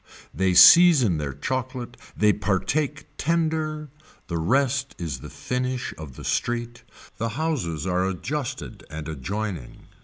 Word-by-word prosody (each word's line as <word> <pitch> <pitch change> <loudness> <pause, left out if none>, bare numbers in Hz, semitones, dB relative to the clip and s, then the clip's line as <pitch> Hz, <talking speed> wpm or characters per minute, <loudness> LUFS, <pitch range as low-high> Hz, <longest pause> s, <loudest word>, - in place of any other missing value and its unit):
They 95 -1 +1
season 140 - +8
their 70 -3 -4
chocolate, 125 - -4 0.2
they 105 -1 +4
partake 145 +10 -1
tender, 155 -2 -1 0.4
the 85 -1 -2
rest 135 +8 +1
is 80 -7 -4
the - - -9
finish 125 0 -3
of 75 -5 -10
the - - -10
street, 120 0 -2 0.4
the 115 - -2
houses 115 - -2
are 90 0 +1
adjusted 130 +8 -5
and 75 0 -7
adjoining. 85 - -5
120 Hz, 125 wpm, -24 LUFS, 90-140 Hz, 0.4 s, season